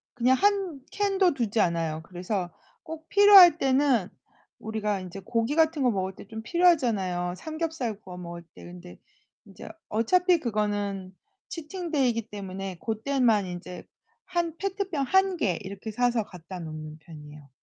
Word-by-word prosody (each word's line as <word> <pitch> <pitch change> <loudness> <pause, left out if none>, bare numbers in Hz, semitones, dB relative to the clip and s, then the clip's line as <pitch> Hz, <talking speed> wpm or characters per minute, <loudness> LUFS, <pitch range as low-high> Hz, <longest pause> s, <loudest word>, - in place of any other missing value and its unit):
그냥 250 +2 +3
한 390 -8 +1
캔도 390 -3 +2
두지 230 -5 -1
않아요. 165 -3 0
그래서 180 +1 -4 0.3
꼭 320 0 -9
필요할 395 -5 +8
때는 265 - +2 0.5
우리가 210 -2 -2
인제 185 +1 -8
고기 230 +6 -1
같은 320 -3 +2
거 250 - +4
먹을 190 -2 -3
때 - - -12
좀 220 +1 -7
필요하잖아요. 220 - +1
삼겹살 315 - -4
구워 180 -1 -10
먹을 170 -1 -8
때. - - -13
근데 175 0 -12 0.5
인제 - - -11 0.2
어차피 355 - +3
그거는 205 -5 -2 0.4
치팅 335 +1 -6
데이이기 240 -7 0
때문에 195 -2 -6
그때만 225 -2 +1
인제 180 0 -8 0.4
한 345 -3 -2
페트병 385 -6 -2
1 380 +3 +2
개 180 - 0
이렇게 200 +3 -7
사서 240 0 +1
갖다 180 -1 -10
놓는 155 -1 -8
편이에요. 150 -3 -13
225 Hz, 305 characters per minute, -27 LUFS, -, 0.5 s, 필요할